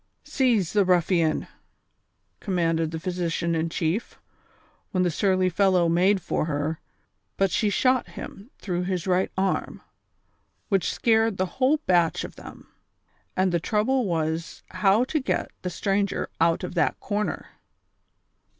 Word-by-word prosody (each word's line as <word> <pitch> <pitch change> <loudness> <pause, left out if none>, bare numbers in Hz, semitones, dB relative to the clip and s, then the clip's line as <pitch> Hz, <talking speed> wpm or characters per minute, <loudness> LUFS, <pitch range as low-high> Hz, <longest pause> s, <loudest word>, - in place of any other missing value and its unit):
'■'■ - - -17
Seize 235 - +1
the 205 -1 +4
ruffian! 175 -3 +2 0.5
" - - -48
commanded 165 -4 +1
the 160 0 -5
physician 170 -1 -2
in 165 0 0
chief, 170 +7 -2 0.8
wlien 185 - +3
the 175 - +1
surly 185 +2 +2
fellow 185 -1 +3
made 185 +3 +2
for - - -1
her, 155 +1 -2 0.6
but 195 -2 +2
she 210 - +1
shot 255 +5 +2
him 205 +5 -10
through 180 -3 -3
his 180 -2 -2
right 185 0 +1
arm, 190 +1 -1 0.9
which 195 -4 +1
scared 225 -3 +2
the 185 - +1 0.2
whole 275 +4 +4
batch 175 -3 +2
of - - -8
them; - - -12 0.7
and 185 0 +2
the 170 - +1
trouble 220 +7 +1
was 160 -1 -2
how 205 +3 +3
to 305 +5 -1
get 265 - -2
the 180 - -3
stranger 195 +2 -1
out 165 +2 +2
of 180 - -4
that 175 - +1
corner. 210 +1 -3
185 Hz, 145 wpm, -25 LUFS, 170-205 Hz, 0.9 s, the